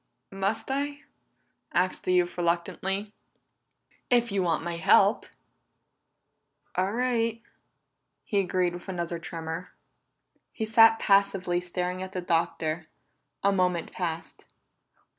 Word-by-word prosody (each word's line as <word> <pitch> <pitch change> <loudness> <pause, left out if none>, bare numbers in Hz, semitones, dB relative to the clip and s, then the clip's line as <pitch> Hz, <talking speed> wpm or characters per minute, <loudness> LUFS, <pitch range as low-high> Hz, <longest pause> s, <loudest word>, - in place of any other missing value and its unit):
"Must 195 +6 -2
I?" 285 +1 -2 0.7
asked 185 +1 0
the 185 - +2
youth 180 -1 +2
reluctantly. 185 +4 -1 1.0
"If 240 -2 +3
you 200 -1 +1
want 170 -3 0
my 170 0 -3
help." 165 - +4 1.5
"All 185 +2 0
right," 230 -2 0 0.8
he 200 - 0
agreed 180 -2 +1
with 175 +2 -9
another 170 -2 -3
tremor. 165 +1 -6 0.8
He 220 - -2
sat 225 0 +6
passively 195 -4 +2
staring 180 +1 -3
at 190 0 -6
the 185 - -2
Doctor; 165 -1 0 0.6
a 200 - +4
moment 180 -3 0
passed. 165 -2 -5
185 Hz, 110 wpm, -27 LUFS, 175-205 Hz, 1.5 s, sat